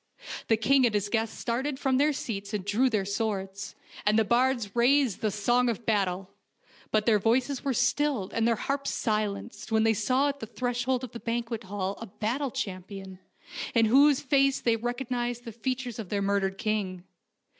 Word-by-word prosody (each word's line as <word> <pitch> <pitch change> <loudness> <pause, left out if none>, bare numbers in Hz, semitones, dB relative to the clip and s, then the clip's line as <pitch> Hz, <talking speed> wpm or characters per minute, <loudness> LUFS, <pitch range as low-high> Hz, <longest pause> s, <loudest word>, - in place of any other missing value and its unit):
The 225 - +3
king 270 +4 +4
and 215 - -2
his 205 0 0
guests 225 0 -1
started 265 +4 -2
from 265 -2 +1
their 295 +2 +4
seats 205 -6 -4
and 195 -3 -4
drew 225 +6 +2
their 210 -5 0
swords, 200 -2 -3 0.3
and 210 +1 +3
the 225 - +5
bards 235 -2 +1
raised 250 -2 +3
the 215 - +1
song 240 +5 +2
of 230 0 -3
battle; 195 -3 0 0.6
but 215 -1 +1
their 220 -3 +4
voices 250 +5 +1
were 275 - 0
stilled 275 -7 +1
and 230 0 +2
their 230 - +3
harps 275 +4 -2
silenced 215 0 -2
when 220 0 +3
they 225 0 +4
saw 255 +7 +2
at 280 0 -4
the 225 - -6
threshold 245 +2 -1
of 250 - -6
the 235 - -7
banquet 230 -1 -3
hall 195 0 -3
a 230 - -6
battle 240 +8 -2
champion, 190 -2 -6 0.6
in 230 -1 +5
whose 275 +5 +5
face 275 0 +3
they 230 -1 +2
recognized 240 +1 -3
the 230 - -6
features 245 +1 -3
of 210 -5 -6
their 200 -1 -1
murdered 195 -1 0
king. 200 -5 -2
230 Hz, 185 wpm, -28 LUFS, 205-255 Hz, 0.6 s, the